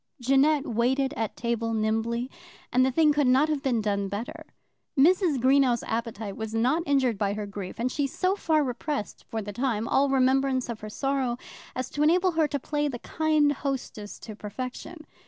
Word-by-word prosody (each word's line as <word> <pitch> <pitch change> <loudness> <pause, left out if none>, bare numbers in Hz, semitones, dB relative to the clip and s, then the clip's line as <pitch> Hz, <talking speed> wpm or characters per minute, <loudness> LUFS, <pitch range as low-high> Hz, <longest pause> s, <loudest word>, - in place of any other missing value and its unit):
Jeannette 275 +4 +3
waited 260 +4 +1
at 225 -5 -3
table 230 -1 -1
nimbly, 225 +3 0 0.5
and 255 +1 +5
the 260 - +3
thing 300 +2 +4
could 290 -2 +2
not 265 +5 +4
have 300 -3 0
been 245 -5 +1
done 200 -1 0
better. 205 +4 -6 0.5
Mrs. 335 0 +4
Greenow's 260 -1 +3
appetite 225 -3 -4
was 220 0 -5
not 255 +9 +2
injured 260 -7 +2
by 200 -1 +1
her 210 -1 -4
grief, 200 -2 -7
and 245 +2 -1
she 285 +1 0
so 370 +7 0
far 315 -6 +2
repressed 265 -2 -4
for 220 -1 -3
the 205 0 -6
time 230 -2 -1
all 280 +1 +3
remembrance 265 -1 +2
of 230 -2 -4
her 215 - -7
sorrow 265 0 -1 0.4
as 255 0 -2
to 290 - -3
enable 360 +5 +4
her 320 -2 +2
to 285 - -2
play 295 +2 -1
the 260 -4 -4
kind 310 +2 +1
hostess 265 -7 -4
to 215 - -8
perfection. 255 - -7
255 Hz, 185 wpm, -27 LUFS, 225-290 Hz, 0.5 s, and